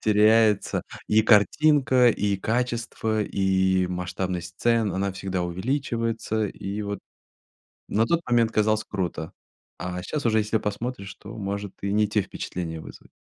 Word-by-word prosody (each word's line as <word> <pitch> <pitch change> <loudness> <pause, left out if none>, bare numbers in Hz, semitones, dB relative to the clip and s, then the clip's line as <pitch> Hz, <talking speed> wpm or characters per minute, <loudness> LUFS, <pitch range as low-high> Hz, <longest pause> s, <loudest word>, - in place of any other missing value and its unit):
теряется 110 0 +3 0.3
и 110 +1 +5
картинка, 130 +3 +5
и 100 -2 0
качество, 115 0 -1
и 95 -2 +1
масштабность 90 0 -3
сцен, 115 -3 +2
она 100 +1 -1
всегда 95 -1 -3
увеличивается. 115 +3 -1
И 100 +1 -5
вот 100 -1 -4 0.9
на 110 +2 +2
тот 170 +7 +2
момент 115 -2 +3
казалось 110 0 +2
круто, 90 -7 -4 0.5
а 90 0 -4
щас 150 +5 -3
уже, 110 -1 +3
если 110 +1 +1
посмотришь, 105 -1 -4
то 105 +3 -11
может 100 -1 -4
и 100 - -2
не 105 +1 +3
те 105 0 +1
впечатления 85 -3 -5
вызвать. - - -12
105 Hz, 135 wpm, -25 LUFS, 95-115 Hz, 0.9 s, и